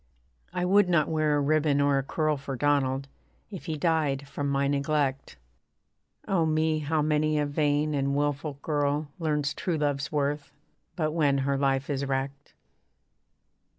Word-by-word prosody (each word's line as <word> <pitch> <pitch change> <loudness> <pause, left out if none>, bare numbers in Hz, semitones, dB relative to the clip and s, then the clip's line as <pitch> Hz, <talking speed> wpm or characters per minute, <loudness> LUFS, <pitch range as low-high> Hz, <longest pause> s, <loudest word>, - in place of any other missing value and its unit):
I 180 - -1
would 195 0 +4
not 170 -4 +3
wear 155 -2 +1
a - - +2
ribbon 145 0 +2
or 140 -1 +3
a - - -2
curl 155 +2 0
For 140 -1 -5
Donald, 135 0 +1 0.4
if 190 - -8
he 160 -1 -2
died 145 -4 0
from 140 0 -3
my 140 0 +1
neglect 140 - -1 0.9
Oh 185 -4 +2
me! 155 0 +1
how 155 +1 0
many 155 0 +1
a 150 - +1
vain 145 +1 +1
and 140 -1 0
wilful 145 +1 -1
girl 145 -1 0
Learns 150 -3 0
true 175 -3 -2
love's 145 -2 -1
worth, 145 -1 -1 0.4
but 155 -3 0
when 150 -4 +2
her 140 0 +1
life 135 0 +1
is 140 -2 -2
wrecked. 135 +1 -4
145 Hz, 155 wpm, -27 LUFS, 140-155 Hz, 0.9 s, would